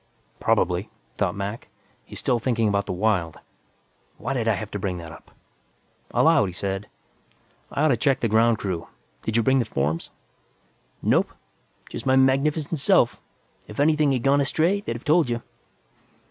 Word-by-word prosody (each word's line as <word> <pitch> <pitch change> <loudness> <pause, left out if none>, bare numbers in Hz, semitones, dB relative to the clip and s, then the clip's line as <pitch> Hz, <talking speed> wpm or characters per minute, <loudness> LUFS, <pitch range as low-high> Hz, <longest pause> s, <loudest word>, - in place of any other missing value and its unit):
Probably, - - +1 0.3
thought - - +1
Mac, 100 +3 -5 0.4
he's - - -9
still 120 - +1
thinking 115 -2 +1
about 100 -1 0
the - - -2
Wyld. 90 -4 0 0.8
Why 130 +5 -3
did 120 -4 -1
I 110 - +3
have 110 +1 -6
to 105 - -4
bring 95 -3 -2
that 85 -2 -8
up? - - -14 0.8
Aloud, - - +4
he 90 - -6
said, 95 +2 -3 0.8
"I 145 - 0
ought 155 - +4
to 130 - +4
check 135 +1 +2
the 115 - +1
ground 115 +1 +3
crew. 95 -5 -4 0.3
Did 110 +1 -1
you 115 - +3
bring 130 +3 +3
the - - +2
forms?" 75 +4 -2 0.9
"Nope. - - +3 0.6
Just - - -7
my 130 - +4
magnificent 140 +4 +2
self. 135 - +3 0.5
If 105 - -9
anything 150 0 +3
had 125 -3 0
gone 140 +1 +4
astray, 170 +8 +1
they'd 115 - -4
have 120 - -9
told 155 -2 +3
you." 120 0 -2
115 Hz, 170 wpm, -24 LUFS, 100-135 Hz, 0.9 s, Aloud